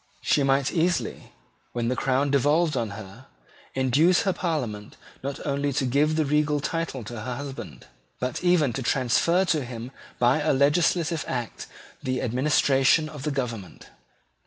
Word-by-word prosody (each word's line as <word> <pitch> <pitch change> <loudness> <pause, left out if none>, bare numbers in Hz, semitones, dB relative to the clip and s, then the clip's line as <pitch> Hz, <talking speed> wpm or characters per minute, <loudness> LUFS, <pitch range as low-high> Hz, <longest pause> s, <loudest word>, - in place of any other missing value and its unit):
She 145 - +3
might 135 0 +2
easily, 175 +1 -1 0.4
when 120 -1 -1
the 125 - 0
crown 135 +3 +1
devolved 150 +3 +2
on 115 -4 -1
her, 110 +5 -11 0.5
induce 140 +7 +3
her 190 - +1
Parliament 125 - -3 0.2
not 140 +1 -5
only 140 0 0
to 130 - 0
give 145 +5 +2
the 155 -1 +1
regal 150 +1 +1
title 150 -4 -3
to 110 +1 -7
her 125 +3 -4
husband, 140 +1 -8 0.3
but 125 +6 -3
even 170 -8 +3
to 135 - -3
transfer 135 +9 +2
to 160 -5 +1
him 120 0 -7 0.3
by 125 +5 +3
a - - +2
legislative 160 +3 +2
act 120 -3 -4 0.3
the 130 -1 -2
administration 135 +4 +3
of 150 -3 -9
the 150 - -2
government. 120 -9 -5
140 Hz, 155 wpm, -25 LUFS, 125-155 Hz, 0.5 s, She